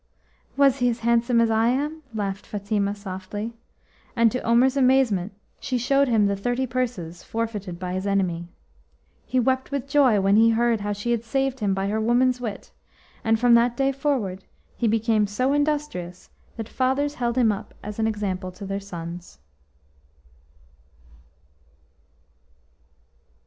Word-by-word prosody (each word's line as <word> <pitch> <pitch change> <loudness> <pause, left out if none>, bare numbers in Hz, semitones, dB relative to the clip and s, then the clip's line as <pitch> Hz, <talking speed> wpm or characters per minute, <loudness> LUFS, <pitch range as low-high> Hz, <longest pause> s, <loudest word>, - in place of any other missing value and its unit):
"Was 275 -1 +4
he 245 0 +3
as 235 -1 -3
handsome 235 +1 +2
as 230 -1 +3
I 220 +1 +3
am?" 295 +6 -1
laughed 200 -2 -4
Fatima 205 0 -1
softly, 200 +3 -6 0.6
and 230 -2 +4
to 250 - -2
Omer's 245 +3 +3
amazement 255 -8 +3 0.3
she 255 - -2
showed 275 +3 +2
him 225 -4 +3
the 200 0 +1
thirty 245 +6 -1
purses 230 -10 -3
forfeited 210 -6 -4
by 180 0 -4
his 185 +2 -3
enemy. 180 -4 0 0.8
He 255 - +1
wept 260 +1 +1
with 280 -1 -3
joy 275 -7 +4
when 195 +1 +3
he 225 +1 +6
heard 230 0 +2
how 205 0 -2
she 205 +4 -2
had 235 -1 0
saved 270 +2 -1
him 200 -3 0
by 195 0 -1
her 215 +2 -1
woman's 245 +2 +2
wit, 220 -4 -6 0.5
and 225 0 +2
from 245 0 +5
that 235 +1 +4
day 275 0 +2
forward 255 -10 -2 0.3
he 235 - 0
became 220 -1 +2
so 255 +7 0
industrious 290 - -2 0.3
that 225 -2 -5
fathers 270 +4 0
held 240 -3 -2
him 235 -4 +4
up 200 - -7
as 210 +1 -7
an 220 - +2
example 195 -4 -3
to 200 +2 -9
their 195 +1 -3
sons. 175 -3 -8
225 Hz, 155 wpm, -24 LUFS, 200-255 Hz, 0.8 s, he